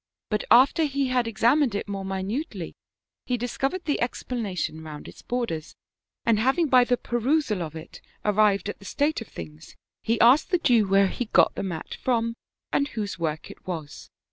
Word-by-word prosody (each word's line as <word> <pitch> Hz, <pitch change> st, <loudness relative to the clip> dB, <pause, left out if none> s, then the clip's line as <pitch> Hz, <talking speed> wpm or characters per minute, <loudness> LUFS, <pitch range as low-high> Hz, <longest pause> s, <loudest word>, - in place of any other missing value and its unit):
But 210 Hz, -, 0 dB
after 265 Hz, +7 st, +6 dB
he 280 Hz, -2 st, -1 dB
had 250 Hz, -2 st, +1 dB
examined 235 Hz, +2 st, +2 dB
it 205 Hz, -, -3 dB
more 200 Hz, -1 st, -4 dB
mi 190 Hz, 0 st, -3 dB
nutely 205 Hz, -, -4 dB, 0.5 s
he 250 Hz, -, 0 dB
discovered 270 Hz, +9 st, -2 dB
the 295 Hz, -, 0 dB
explanation 210 Hz, -9 st, -3 dB
round 155 Hz, -2 st, -9 dB
its -, -, -12 dB
borders, 230 Hz, -11 st, -3 dB, 0.5 s
and 230 Hz, -2 st, +3 dB
having 275 Hz, +7 st, +2 dB
by 250 Hz, -1 st, +6 dB
the 245 Hz, 0 st, +1 dB
perusal 240 Hz, -, 0 dB
of 160 Hz, -1 st, -5 dB
it 160 Hz, 0 st, -10 dB, 0.2 s
arrived 205 Hz, -2 st, +3 dB
at 205 Hz, -, -5 dB
the 200 Hz, -, -14 dB
state 290 Hz, +7 st, 0 dB
of 225 Hz, -, -8 dB
things, 80 Hz, -2 st, -10 dB, 0.3 s
he 230 Hz, +1 st, 0 dB
asked 255 Hz, +6 st, +6 dB
the 360 Hz, -, +3 dB
Jew 235 Hz, -, +3 dB
where 195 Hz, +1 st, +5 dB
he 245 Hz, -, -3 dB
got 220 Hz, -, +4 dB
the -, -, -4 dB
mat 175 Hz, -5 st, -5 dB
from, 230 Hz, -2 st, +1 dB, 0.4 s
and 280 Hz, -, +2 dB
whose 205 Hz, -8 st, -5 dB
work 155 Hz, -2 st, -3 dB
it -, -, -17 dB
was 160 Hz, -5 st, -6 dB
225 Hz, 185 wpm, -25 LUFS, 190-255 Hz, 0.5 s, after